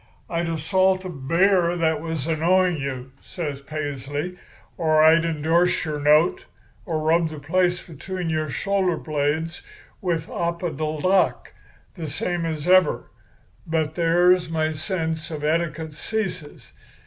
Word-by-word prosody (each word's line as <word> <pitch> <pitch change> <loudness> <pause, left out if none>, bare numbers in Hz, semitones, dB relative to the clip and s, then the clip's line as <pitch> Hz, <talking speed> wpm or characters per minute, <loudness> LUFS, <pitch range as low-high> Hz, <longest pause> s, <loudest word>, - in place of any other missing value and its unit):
I'd 170 0 -1
assault 185 +4 +1
a - - -4
bear 170 +4 +2
that 160 -2 +1
was 160 -4 -3
annoying 170 +2 +2
you,' 135 -2 -5
says 145 -6 -5
Paisley, 145 +3 -4 0.4
'or 155 -2 +2
I'd 160 +1 +6
endorse 165 +3 +1
your 150 -2 -3
note, 150 +4 +3 0.4
or 165 -3 -1
rub 160 +1 +2
the 155 - -8
place 175 +4 +1
between 180 +3 -6
your 155 -1 -1
shoulder 190 +2 0
blades 155 +2 -2 0.4
with 170 -4 -1
opodeldoc 170 +1 0 0.4
the 165 -4 -6
same 170 +3 -2
as 155 0 -4
ever; 185 -3 +3 0.6
but 160 -1 0
there 175 +2 +4
my 160 -1 0
sense 160 -1 -3
of 155 -2 -6
etiquette 160 0 -1
ceases. 180 -4 -5
165 Hz, 125 wpm, -23 LUFS, 155-175 Hz, 0.6 s, I'd